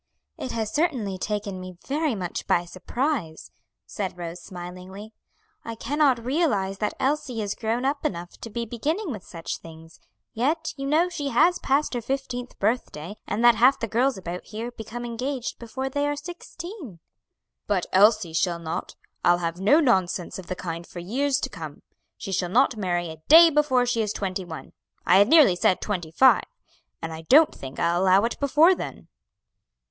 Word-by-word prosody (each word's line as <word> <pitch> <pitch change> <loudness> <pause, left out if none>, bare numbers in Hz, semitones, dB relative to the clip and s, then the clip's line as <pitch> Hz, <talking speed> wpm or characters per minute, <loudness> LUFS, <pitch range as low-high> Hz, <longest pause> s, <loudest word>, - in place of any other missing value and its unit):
"It 130 - -6
has 220 -2 -3
certainly 245 - 0
taken 205 -2 -3
me 185 -1 -9
very 295 -2 0
much 180 -3 -5
by 175 - +2
surprise," 190 - -3 0.3
said 190 -4 -5
Rose, 175 0 -6
smiling. 185 +4 -9 0.5
"I 230 - -6
cannot 260 0 +1
realize 225 - 0
that 210 - -1
Elsie 270 -4 -1
is 205 -2 -2
grown 235 +3 -2
up 280 +1 -1
enough 175 -1 -3
to 230 - -7
be 235 +2 -3
beginning 305 - -2
with 210 -6 -6
such 165 -2 -6
things; 160 0 -14 0.3
yet 305 +8 -1
you 275 -1 -4
know 315 +5 +3
she 295 -5 -4
has 345 +5 +3
passed 275 +2 +1
her 240 - -2
fifteenth 250 0 -4
birthday, 205 -5 -2
and 230 +3 0
that 240 - +8
half 255 +4 +4
the 230 - -2
girls 245 +3 +1
about 180 -1 -6
here 225 +3 -6
become 240 +1 -7
engaged 250 +2 -4
before 255 +3 -4
they 285 +2 -1
are 290 - -1
sixteen." 340 - -9 0.7
"But 195 -4 +1
Elsie 205 -3 +4
shall 170 +2 +1
not. 165 -1 -5 0.3
I'll 175 0 +5
have 170 0 -3
no 215 +11 +5
nonsense 190 - +1
of 180 - -10
the 185 - -3
kind 170 -1 -6
for - - -12
years 260 +10 0
to - - -1
come. 160 - -9 0.3
She 195 - -6
shall 180 -1 -1
not 255 +7 +3
marry 175 -5 -2
a 160 -1 -12
day 330 +2 +9
before 280 -4 +3
she 240 -2 0
is 210 -1 -1
twenty 190 -1 -3
one, 160 -2 -9 0.3
I 185 +3 +6
had 205 - +6
nearly 290 - +6
said 180 +1 +2
twenty 180 -6 -3
five; 260 +11 +5 0.6
and 165 0 -4
I 160 - -7
don't 310 +3 +7
think 135 0 -9
I'll 170 +1 +2
allow 190 +1 +5
it 230 - -2
before 300 +6 +5
then." - - -7
220 Hz, 180 wpm, -25 LUFS, 180-275 Hz, 0.7 s, day